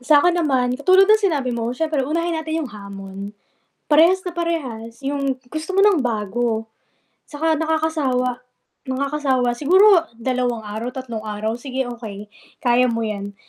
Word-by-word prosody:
Sa'kin 310 +4 +5
naman 260 -6 +1
katulad 370 +6 +5
ng 430 0 +5
sinabi 275 -5 -1
mo 235 +1 -2
siyempre 305 0 -1
unahin 335 +3 -1
natin 320 0 -2
yung 255 - -8
hamon. 200 -1 -8 0.6
Parehas 335 +5 +5
na 360 - -3
parehas. 265 -9 -4
Yung 275 -1 -1
gusto 315 +4 -4
mo 390 - +5
ng 400 -7 +4
bago 225 -1 -1 0.6
tsaka 315 +1 0
nakakasawa, 305 -6 0 0.5
nakakasawa. 265 -2 0
Siguro 355 - +5
dalawang 245 -1 -1
araw, 215 +3 -5
tatlong 235 -4 -5
araw, 215 +3 -3
sige 265 0 -3
okey, 210 -4 -8 0.3
kaya 245 +1 +4
mo 230 -1 -1
'yan. 200 -2 -4
260 Hz, 140 wpm, -21 LUFS, 230-320 Hz, 0.6 s, Sa'kin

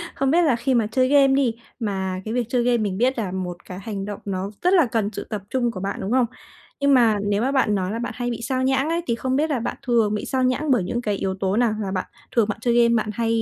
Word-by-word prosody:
Không 270 0 +1
biết 345 - +4
là 290 -8 +3
khi 260 +3 0
mà 230 -4 +2
chơi 255 +3 +2
game 280 0 +5
đi, 270 -3 +2 0.3
mà 190 -4 -2
cái 220 - -3
việc 245 -1 0
chơi 250 -1 +1
game 245 0 +3
mình 205 -4 -2
biết 250 +3 +1
là 200 -5 -2
một 180 -2 -5
cái 185 0 -8
hành 195 -1 -5
động, 205 -1 -6
nó 195 0 -3
rất 360 +2 +3
là 345 -6 +6
cần 225 -3 -1
sự - - -5
tập 210 -3 -3
trung 240 -3 0
của 185 - -7
bạn, 195 +2 -3
đúng 195 - -3
không? 255 -1 +4 0.5
Nhưng 280 0 +3
mà 230 -4 +5
nếu 205 0 0
mà 260 +3 +1
bạn 260 -7 +2
nói 185 -1 -1
là 230 - -3
bạn 240 - -4
hay 245 -1 -2
bị 235 -1 -4
sao 260 +2 -1
nhãng 265 +3 +1
ấy, 335 +1 0
thì 235 - +1
không 260 +2 -1
biết 310 +3 +1
là 270 -5 0
bạn 230 - -4
thường 225 -3 +3
bị 210 - -3
sao 260 -1 0
nhãng 270 +3 +1
bởi 235 -8 +3
những 240 +6 -2
cái 210 -4 -1
yếu 190 -1 -2
tố 195 +1 0
nào? 235 -2 +3
Là 195 - -3
bạn 185 -1 -2 0.3
thường 230 -4 +4
bạn 210 - -2
chơi 240 0 +1
game 235 0 +3
bạn 215 -1 0
hay 230 +1 0
235 Hz, 300 wpm, -23 LUFS, 205-260 Hz, 0.5 s, là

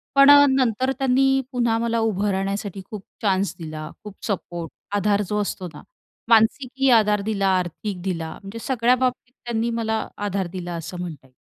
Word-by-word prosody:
पण 275 +1 +8
अ, 285 0 +9
नंतर 260 -1 +1
त्यांनी 270 +1 +3
पुन्हा 235 -2 +1
मला 230 0 0
उभं 210 -2 0
राहण्यासाठी 195 0 -3
खूप 210 -3 -6 0.2
चान्स 195 -2 +1
दिला. 155 -1 -6
खूप 210 -2 -9
सपोर्ट, 175 -4 -4 0.2
आधार 205 0 +2
जो 210 0 0
असतो 190 -2 -4
ना - - -11 0.5
मानसिकीही 255 +4 +3
आधार 210 -3 +4
दिला, 200 -2 0
आर्थिक 180 +2 -4
दिला 165 -4 -3
म्हणजे 200 +4 -8
सगळ्या 250 0 +2
बाबतीत 250 0 -2
त्यांनी 235 0 -1
मला 220 -1 -1 0.2
आधार 195 -2 -1
दिला 175 -1 -5
असं 170 +2 -6
म्हणता 160 -6 -7
येईल. 130 - -31
210 Hz, 170 wpm, -23 LUFS, 190-235 Hz, 0.5 s, अ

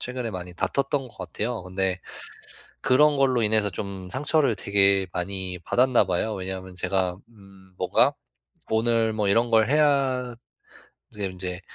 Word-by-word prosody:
최근에 125 -2 -4
많이 90 -2 -7
다퉜던 135 +5 -1
것 - - -19
같아요. 110 -2 -4
근데 95 0 -2 0.8
그런 145 +3 +4
걸로 130 -3 +2
인해서 105 -1 +2
좀 95 0 -6
상처를 140 -1 +1
되게 100 -1 +2
많이 95 0 -4
받았나 125 +5 +3
봐요. 100 +5 -1
왜냐하면 95 0 -6
제가 90 -1 -1
음 95 -3 -18
뭔가 - - +3 0.6
"오늘 115 0 +2
뭐 105 -2 0
이런 115 +4 +3
걸 110 -1 +4
해야" 135 -5 +2 0.8
지금 100 -3 -4
인제 90 0 -5
105 Hz, 280 characters per minute, -25 LUFS, 95-125 Hz, 0.8 s, 그런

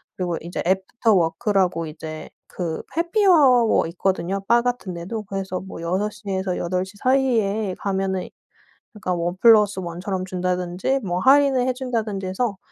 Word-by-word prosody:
그리고 175 -2 -2
이제 170 +2 -5
애프터 190 +4 +1
워크라고 180 -1 +1
이제 155 0 -8 0.2
그 170 -3 -4
해피아워 330 - +4
있거든요, 190 +2 -1
바 235 +1 +5
같은 245 -6 -3
데도. 210 +6 -5
그래서 190 -2 -4
뭐 190 -3 -9
6 190 +5 -1
시에서 190 -3 -3
8 180 +1 -1
시 190 +2 -14
사이에 220 -6 +1
가면은 190 -2 -2 0.6
그러니까 200 -4 -3
1+1 185 0 +3
처럼 190 -1 -3
준다든지 180 +6 -1
뭐 180 -3 -2
할인을 270 0 +4
해준다든지 230 -6 -2
해서 200 +2 -2
195 Hz, 295 characters per minute, -22 LUFS, 180-230 Hz, 0.6 s, 바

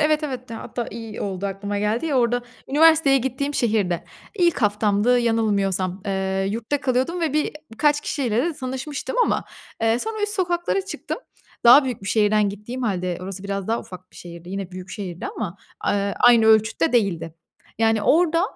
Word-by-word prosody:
evet, 305 0 +2
evet, 255 -4 -5
hatta 230 +1 -5
i - - -8
iyi 225 -2 -7
oldu 195 -1 -3
aklıma 200 +1 -3
geldi. 215 +9 0
Ya, 275 -4 +1
orada 245 0 +1 0.3
üniversiteye 300 -1 +5
gittiğim 265 +3 -2
şehirde 210 -9 0 0.3
ilk 345 - +2
haftamdı 210 +3 +2
yanılmıyorsam. 200 -5 0
Iıı, 190 0 -1
yurtta 230 +7 -2
kalıyordum 260 +6 0
ve 320 -4 0
bi 305 0 0 0.2
birkaç 295 +4 +2
kişiyle 260 -7 -2
de 340 - 0
tanışmıştım 270 - -5
ama, - - 0 0.4
eee, 225 +1 +3
sonra 435 - -4
üst 415 0 0
sokaklara 350 +1 0
çıktım. 395 - -5 0.5
Daha 255 +4 +9
büyük 245 -6 -4
bir 195 - -5
şehirden 210 -1 +3
gittiğim 210 +6 -6
hâlde 185 -5 -1
orası 190 0 -6
biraz 200 0 -3
daha 230 - 0
ufak 185 0 -12
bir - - -16
şehirdi 170 0 -10
yine 195 -1 -4
büyük 185 0 -9
şehirdi 180 -5 -6
ama. 200 -4 -5 0.2
Aaa, 200 0 0
aynı 235 -2 +6
ölçütte 220 -4 +3
değildi. 180 -9 0 0.4
Yani, 225 -1 +2
orada 335 +5 +3
225 Hz, 170 wpm, -23 LUFS, 200-275 Hz, 0.5 s, Daha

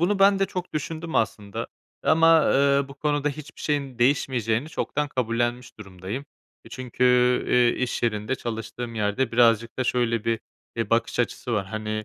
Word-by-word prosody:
bunu 195 +4 +2
ben 195 0 +5
de 195 - +2
çok 180 -1 -6
düşündüm 160 +2 -4
aslında 105 -2 -1 0.4
ama, 165 0 +5
eee, 140 0 +3
bu 140 - -10
konuda 145 0 0
hiçbir 150 +1 -9
şeyin 140 -5 -2
değişmeyeceğini 125 -1 +1
çoktan 150 -1 -2
kabullenmiş 120 -1 -2
durumdayım. 100 +6 -7 0.4
E, - - -13
çünkü, 125 0 -3 0.4
eee, 125 0 +3
iş 125 - -2
yerinde 110 +2 0
çalıştığım 115 0 -5
yerde 110 +3 -1
birazcık 115 0 +3
da 130 - +1
şöyle 115 -2 0
bir, 115 -1 0 0.4
e, 115 - -2
bakış 115 +1 +1
açısı 120 0 -2
var. 100 -3 0
Hani, 110 0 -4
120 Hz, 160 wpm, -25 LUFS, 115-145 Hz, 0.4 s, ben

